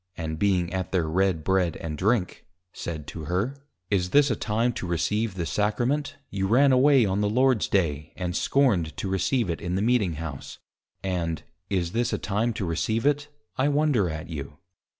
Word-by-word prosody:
_ -, -, -53 dB
(and 80 Hz, -2 st, -4 dB
being 90 Hz, -3 st, +1 dB
at 95 Hz, -1 st, -3 dB
their 85 Hz, -4 st, +1 dB
Red 90 Hz, -1 st, +1 dB
bread 95 Hz, -1 st, +1 dB
and 80 Hz, -2 st, -5 dB
drink) 100 Hz, +3 st, 0 dB, 0.3 s
said 80 Hz, -4 st, -5 dB
to 80 Hz, +1 st, -7 dB
her, 95 Hz, -, -1 dB, 0.4 s
_Is 90 Hz, -3 st, +1 dB
this 145 Hz, +4 st, +4 dB
a -, -, +1 dB
time 115 Hz, +4 st, 0 dB
to 95 Hz, -, -5 dB
receive 105 Hz, +5 st, 0 dB
the 85 Hz, -3 st, -2 dB
Sacrament, 125 Hz, -, 0 dB, 0.2 s
you 95 Hz, -1 st, -1 dB
ran 135 Hz, +6 st, +5 dB
away 130 Hz, -1 st, +5 dB
on 100 Hz, +1 st, 0 dB
the 105 Hz, -, +1 dB
Lord's 125 Hz, 0 st, +3 dB
Day, 80 Hz, -5 st, 0 dB
and 90 Hz, -1 st, -3 dB
scorned 95 Hz, -, +2 dB
to -, -, -3 dB
receive 95 Hz, +5 st, +1 dB
it 85 Hz, -2 st, -3 dB
in 90 Hz, +1 st, -2 dB
the 95 Hz, -, 0 dB
Meeting 110 Hz, -7 st, +2 dB
House, 75 Hz, -3 st, -7 dB, 0.5 s
and, 85 Hz, -5 st, -2 dB, 0.3 s
Is 90 Hz, -4 st, 0 dB
this 120 Hz, +3 st, 0 dB
a -, -, +1 dB
time 105 Hz, +4 st, 0 dB
to 100 Hz, -, -3 dB
receive 110 Hz, -, -1 dB
it? 145 Hz, 0 st, +2 dB, 0.3 s
I 135 Hz, -, +3 dB
wonder 145 Hz, -, +2 dB
at 80 Hz, +1 st, -5 dB
you! 75 Hz, -2 st, -7 dB
95 Hz, 190 wpm, -26 LUFS, 85-120 Hz, 0.5 s, ran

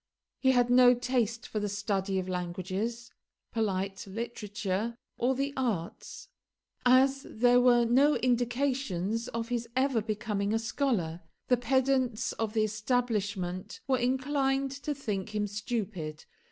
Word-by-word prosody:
He 260 Hz, -, +3 dB
had 245 Hz, -1 st, +3 dB
no 250 Hz, 0 st, +7 dB
taste 240 Hz, -2 st, -1 dB
for 215 Hz, -, -3 dB
the 205 Hz, 0 st, -2 dB
study 200 Hz, -1 st, -1 dB
of 185 Hz, -1 st, -2 dB
languages, 185 Hz, +6 st, -3 dB, 0.4 s
polite 195 Hz, -3 st, -2 dB
literature, 210 Hz, 0 st, -3 dB, 0.2 s
or 255 Hz, +2 st, +2 dB
the 275 Hz, +2 st, -1 dB
arts. 220 Hz, -11 st, -3 dB, 0.6 s
As 265 Hz, +2 st, +4 dB
there 245 Hz, +2 st, +4 dB
were 240 Hz, -1 st, +5 dB
no 275 Hz, +6 st, +4 dB
indications 240 Hz, -4 st, 0 dB
of 230 Hz, 0 st, -4 dB
his 235 Hz, -1 st, -2 dB
ever 260 Hz, -3 st, +2 dB
becoming 210 Hz, -1 st, -1 dB
a -, -, +3 dB
scholar, 225 Hz, -, -1 dB, 0.3 s
the 250 Hz, -, +5 dB
pedants 255 Hz, -1 st, +1 dB
of 220 Hz, -1 st, -3 dB
the 220 Hz, -1 st, +2 dB
establishment 210 Hz, -4 st, -1 dB
were 260 Hz, -2 st, +2 dB
inclined 270 Hz, +1 st, +1 dB
to 280 Hz, +2 st, -4 dB
think 210 Hz, -6 st, -4 dB
him 210 Hz, 0 st, +1 dB
stupid. 205 Hz, -7 st, -4 dB
230 Hz, 130 wpm, -30 LUFS, 205-255 Hz, 0.6 s, no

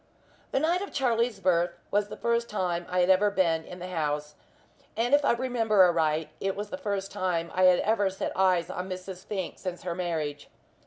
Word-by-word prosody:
The -, -, +2 dB
night 340 Hz, +5 st, +1 dB
of 400 Hz, -, -5 dB
Charlie's 235 Hz, -4 st, 0 dB
birth 175 Hz, -2 st, +1 dB
was 205 Hz, 0 st, +2 dB
the -, -, -8 dB
first 235 Hz, 0 st, 0 dB
time 175 Hz, -4 st, -2 dB
I 180 Hz, 0 st, +2 dB
had 180 Hz, +1 st, +4 dB
ever 200 Hz, +2 st, +4 dB
been 170 Hz, -5 st, +1 dB
in 180 Hz, -, -10 dB
the 180 Hz, 0 st, -7 dB
house, 150 Hz, -3 st, -2 dB, 0.6 s
and 240 Hz, +4 st, +1 dB
if 290 Hz, 0 st, +5 dB
I -, -, +4 dB
remember 230 Hz, -5 st, +3 dB
aright 160 Hz, -3 st, +2 dB
it 195 Hz, 0 st, -1 dB
was 205 Hz, +1 st, -5 dB
the -, -, -2 dB
first 200 Hz, -5 st, -3 dB
time 170 Hz, -3 st, -1 dB
I 185 Hz, 0 st, +3 dB
had 180 Hz, -1 st, +7 dB
ever 205 Hz, -2 st, +2 dB
set 190 Hz, -, -4 dB
eyes 185 Hz, -2 st, +2 dB
on 180 Hz, +1 st, -5 dB
Mrs. 185 Hz, 0 st, -7 dB
Fink 190 Hz, -4 st, -5 dB
since 180 Hz, -2 st, -5 dB
her 175 Hz, -1 st, -2 dB
marriage. 160 Hz, -5 st, -3 dB
185 Hz, 205 wpm, -28 LUFS, 175-210 Hz, 0.6 s, had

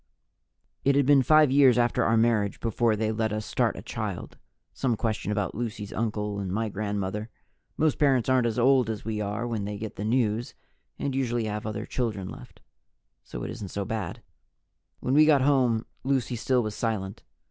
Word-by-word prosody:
It 140 Hz, 0 st, +3 dB
had 140 Hz, -1 st, +3 dB
been 140 Hz, 0 st, +6 dB
five 155 Hz, +1 st, +5 dB
years 135 Hz, -3 st, +6 dB
after 120 Hz, -1 st, +2 dB
our 115 Hz, -, +3 dB
marriage 110 Hz, -3 st, +2 dB
before 115 Hz, 0 st, +1 dB
they 110 Hz, +1 st, 0 dB
let 110 Hz, 0 st, -1 dB
us 105 Hz, 0 st, -3 dB
start -, -, 0 dB
a -, -, -8 dB
child: -, -, -5 dB, 0.3 s
some 120 Hz, +8 st, 0 dB
question 110 Hz, -2 st, -2 dB
about 105 Hz, -2 st, -1 dB
Lucy's 110 Hz, -2 st, -5 dB
uncle 105 Hz, -2 st, -2 dB
and 95 Hz, -2 st, -3 dB
my 110 Hz, +3 st, -1 dB
grandmother. 105 Hz, +1 st, -3 dB, 0.5 s
Most 155 Hz, -2 st, +1 dB
parents 135 Hz, -5 st, +3 dB
aren't 130 Hz, -2 st, +3 dB
as 115 Hz, -, -2 dB
old 125 Hz, -1 st, +4 dB
as 110 Hz, -3 st, -4 dB
we 110 Hz, -1 st, -2 dB
are 105 Hz, +3 st, -2 dB
when 115 Hz, -4 st, -2 dB
they 105 Hz, 0 st, -4 dB
get 110 Hz, 0 st, -7 dB
the 105 Hz, -, -4 dB
news 115 Hz, 0 st, 0 dB, 0.4 s
and 140 Hz, -, -2 dB
usually 120 Hz, -3 st, 0 dB
have 105 Hz, 0 st, -4 dB
other 110 Hz, -, -4 dB
children 105 Hz, -7 st, -3 dB
left, -, -, -12 dB, 0.6 s
so -, -, -7 dB
it -, -, -4 dB
isn't 105 Hz, -5 st, -7 dB
so 100 Hz, +1 st, -3 dB
bad. 105 Hz, -5 st, -4 dB, 0.8 s
When 130 Hz, -, -1 dB
we 155 Hz, +2 st, +6 dB
got 145 Hz, -4 st, +5 dB
home, 125 Hz, -5 st, +2 dB, 0.2 s
Lucy 130 Hz, -2 st, 0 dB
still 125 Hz, +1 st, +1 dB
was 110 Hz, -1 st, -3 dB
silent. 105 Hz, -4 st, -3 dB
115 Hz, 190 wpm, -27 LUFS, 105-125 Hz, 0.8 s, been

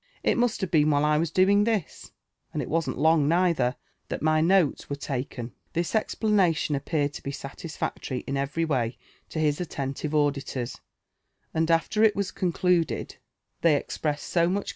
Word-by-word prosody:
It -, -, +3 dB
must 240 Hz, -3 st, +1 dB
have 190 Hz, -, -2 dB
been 155 Hz, -2 st, +4 dB
while 145 Hz, 0 st, +3 dB
I 150 Hz, 0 st, +3 dB
was 165 Hz, 0 st, 0 dB
doing 195 Hz, +4 st, +4 dB
this, 215 Hz, -6 st, -2 dB, 0.4 s
and -, -, -3 dB
it -, -, -7 dB
wasn'l 160 Hz, -5 st, -1 dB
long 155 Hz, 0 st, +4 dB
neither, 165 Hz, -7 st, +2 dB, 0.3 s
tliat -, -, -3 dB
mv 155 Hz, 0 st, +3 dB
notes 185 Hz, -6 st, +2 dB
were 140 Hz, -, -2 dB
taken." 130 Hz, -3 st, -4 dB, 0.2 s
This 170 Hz, 0 st, -1 dB
explanation 205 Hz, -8 st, +1 dB
appeared 145 Hz, 0 st, -1 dB
(o -, -, -14 dB
be -, -, -4 dB
satisfactory 140 Hz, -1 st, -5 dB
in 140 Hz, -, -3 dB
every 140 Hz, +4 st, -1 dB
way 125 Hz, -6 st, -1 dB, 0.3 s
to -, -, -7 dB
his 150 Hz, 0 st, +1 dB
at 175 Hz, -, -4 dB
tentive 140 Hz, +2 st, -3 dB
auditors; 140 Hz, -4 st, -1 dB, 0.7 s
and 160 Hz, +1 st, +1 dB
after 165 Hz, +6 st, +2 dB
it 215 Hz, -2 st, +5 dB
was 200 Hz, -1 st, -1 dB
concluded, 180 Hz, -2 st, 0 dB, 0.4 s
they 165 Hz, -3 st, +5 dB
expressed 145 Hz, +1 st, -2 dB
so 175 Hz, -, 0 dB
much -, -, +5 dB
JONATHAN 170 Hz, -, +3 dB
JEFFERSON 185 Hz, -, +1 dB
WHITLAW. 200 Hz, -, -3 dB
155 Hz, 185 wpm, -26 LUFS, 145-180 Hz, 0.7 s, it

